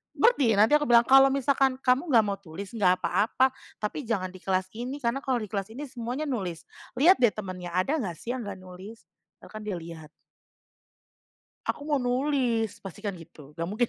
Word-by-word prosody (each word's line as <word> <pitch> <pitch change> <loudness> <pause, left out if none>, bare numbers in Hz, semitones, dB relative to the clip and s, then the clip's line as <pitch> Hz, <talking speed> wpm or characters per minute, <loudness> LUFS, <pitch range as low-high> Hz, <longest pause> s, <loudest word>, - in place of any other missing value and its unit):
berhenti 280 - +4
nanti 215 +6 +5
aku 295 - -3
bilang 235 0 +6
kalau 270 0 +8
misalkan 270 -1 +2
kamu 260 +6 +2
nggak 225 -3 +6
mau 200 -1 -3
tulis 190 +2 -9
nggak 185 -5 +2
apa-apa 255 +5 +2 0.3
tapi 270 +7 -3
jangan 185 -5 -1
di 185 - -12
kelas 185 0 -1
ini 245 +5 -5
karena 235 +4 0
kalau 260 -3 -1
di - - -6
kelas 200 -1 -2
ini 290 - -5
semuanya 250 +3 -4
nulis 190 - -3 0.4
liat 360 +7 +6
deh 240 -4 +5
temennya 185 -4 -6
ada 275 +12 +1
nggak 180 -8 -3
sih 235 - -5
yang 245 - -5
nggak 195 -2 -6
nulis, 185 +4 -11 0.4
bahkan 215 - -9
dia 205 -3 -3
lihat. 165 -2 -9 1.6
Aku 290 - -2
mau 290 -3 0
nulis 245 -4 0
pastikan 200 +2 -6
gitu 155 -3 -14
nggak 165 +1 -4
mungkin 225 +4 0
225 Hz, 185 wpm, -27 LUFS, 185-260 Hz, 1.6 s, kalau